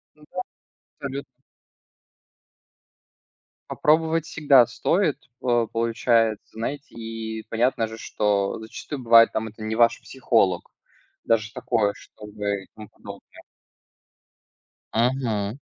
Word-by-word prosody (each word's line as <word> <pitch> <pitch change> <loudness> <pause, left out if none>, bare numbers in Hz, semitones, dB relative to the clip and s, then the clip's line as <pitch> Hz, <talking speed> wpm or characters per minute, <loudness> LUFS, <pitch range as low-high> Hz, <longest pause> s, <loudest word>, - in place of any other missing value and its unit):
Да, 150 - -23 0.8
абсолютно. 140 0 -5 2.5
Попробовать 160 +1 +2
всегда 140 -6 +5
стоит, 170 - +1 0.2
по 120 -2 +2
получается. 115 -1 +1
Знаете, 135 +6 -5
и 110 -1 -6
понятно 115 0 +1
же, 110 0 -9
что 100 -3 0
зачастую 130 +5 -7
бывает, 115 -1 +7
там, 110 0 -2
это 110 +1 -16
не 110 0 -2
ваш 115 0 +4
психолог, 110 -9 +1 0.5
даже 110 -1 +1
такое, 110 -4 0
чтобы 105 -1 -5
и - - -21
тому 105 -1 -11
подобное. - - -13 1.5
Мгм. 115 -2 0
115 Hz, 100 wpm, -24 LUFS, 110-130 Hz, 2.5 s, бывает